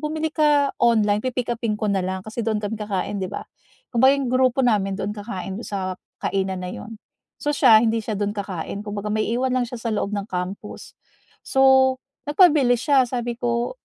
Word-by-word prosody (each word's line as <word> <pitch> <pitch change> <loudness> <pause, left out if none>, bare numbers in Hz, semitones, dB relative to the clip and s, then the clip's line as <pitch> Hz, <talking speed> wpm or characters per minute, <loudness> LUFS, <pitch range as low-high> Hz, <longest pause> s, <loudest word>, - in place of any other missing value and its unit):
bumili 310 +1 -2
ka 295 -3 +3
online, 210 -3 +3
pi-pick-upin 240 -3 -2
ko 210 -1 -1
na 195 - +1
lang." 185 +1 -4
Kasi 220 +2 -5
doon 220 -1 0
kami 210 +1 -4
kakain, 200 -1 -2
'di 185 - -2
ba? - - -6 0.5
Kumbaga 260 +4 +5
'yong 265 -3 -2
grupo 255 0 +3
namin 195 -4 +1
doon 205 +1 -3
kakain, 200 -2 -6
do'n - - -8
sa 190 -2 -3 0.3
kainan 190 -1 -1
na 180 - -5
'yon. 225 0 -8 0.4
So 295 - -1
siya, 235 -5 +6
hindi 225 0 +1
siya 215 -1 -4
do'n 205 0 -1
kakain, 200 -2 -5
kumbaga 210 0 -4
maiiwan 235 +4 0
lang 250 -2 0
siya 245 - -6
sa 230 -2 -2
loob 205 -1 -1
ng 200 - -3
campus. 180 +2 -6 0.5
So, 265 -1 +4 0.3
nagpabili 290 -6 +5
siya, 265 +1 +3
sabi 240 -1 -3
ko, 240 - -1
225 Hz, 185 wpm, -23 LUFS, 205-255 Hz, 0.5 s, siya